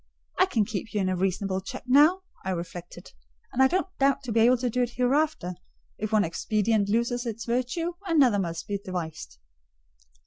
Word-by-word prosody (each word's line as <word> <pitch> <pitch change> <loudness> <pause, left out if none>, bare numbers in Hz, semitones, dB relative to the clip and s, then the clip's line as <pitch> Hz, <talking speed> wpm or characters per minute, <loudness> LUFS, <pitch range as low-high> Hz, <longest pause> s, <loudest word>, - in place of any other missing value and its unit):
"I 370 - +5
can 225 - +1
keep 215 0 -5
you - - +2
in 185 -1 0
reasonable 190 +1 -1
check 190 - -7
now," 295 +9 +5 0.2
I 190 - -3
reflected; 175 0 -7 0.4
"and 260 - +1
I 265 - +7
don't 370 +7 0
doubt 275 0 +2
to 250 - -4
be 225 - +2
able 245 +3 +5
to 250 +1 -1
do 250 - 0
it 245 -1 -1
hereafter: 250 - +1 0.5
if 215 +1 -3
one 215 -1 +4
expedient 210 +4 0
loses 235 +3 0
its 230 0 -5
virtue, 255 +9 -1
another 270 - +4
must 170 -2 -3
be 200 -1 -2
devised." 165 - -6
225 Hz, 180 wpm, -27 LUFS, 190-255 Hz, 0.5 s, I